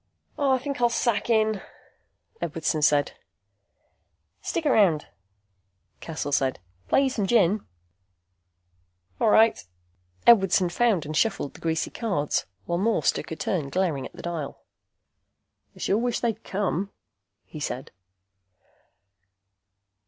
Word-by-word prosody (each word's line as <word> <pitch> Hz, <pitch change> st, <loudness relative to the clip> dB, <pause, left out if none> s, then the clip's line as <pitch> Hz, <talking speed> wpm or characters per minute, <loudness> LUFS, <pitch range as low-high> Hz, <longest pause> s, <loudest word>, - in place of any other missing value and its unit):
"I 270 Hz, -2 st, +2 dB
think 270 Hz, 0 st, -5 dB
I'll 240 Hz, -, +5 dB
sack 235 Hz, -1 st, 0 dB
in," 220 Hz, -3 st, +2 dB, 0.8 s
Edwardson 160 Hz, -2 st, -1 dB
said. 145 Hz, -1 st, +3 dB, 1.3 s
"Stick 330 Hz, -, -3 dB
around," 195 Hz, -, +3 dB, 0.9 s
Cassel 155 Hz, -3 st, -5 dB
said. 135 Hz, -2 st, +1 dB, 0.3 s
"Play 275 Hz, -, +4 dB
you 270 Hz, -, +2 dB
some 210 Hz, -6 st, -1 dB
gin." 205 Hz, -2 st, +3 dB, 1.6 s
"All -, -, +3 dB
right." 220 Hz, +1 st, +4 dB, 0.6 s
Edwardson 195 Hz, -5 st, +5 dB
found 200 Hz, -3 st, +1 dB
and 155 Hz, +1 st, -5 dB
shuffled 195 Hz, -5 st, 0 dB
the -, -, -15 dB
greasy 160 Hz, -1 st, -1 dB
cards, 190 Hz, -11 st, -1 dB, 0.2 s
while 170 Hz, +7 st, -1 dB
Morse 205 Hz, -7 st, +2 dB
took -, -, -6 dB
a -, -, -2 dB
turn 160 Hz, -4 st, -2 dB
glaring 160 Hz, -7 st, -1 dB
at -, -, -24 dB
the -, -, -11 dB
dial. 165 Hz, -5 st, -5 dB, 1.1 s
"I -, -, -18 dB
sure 200 Hz, -, +1 dB
wish 240 Hz, 0 st, -1 dB
they'd 225 Hz, -2 st, -2 dB
come," 195 Hz, 0 st, -2 dB, 0.6 s
he 155 Hz, -, -10 dB
said. 135 Hz, -3 st, -4 dB
190 Hz, 120 wpm, -25 LUFS, 155-230 Hz, 1.6 s, I'll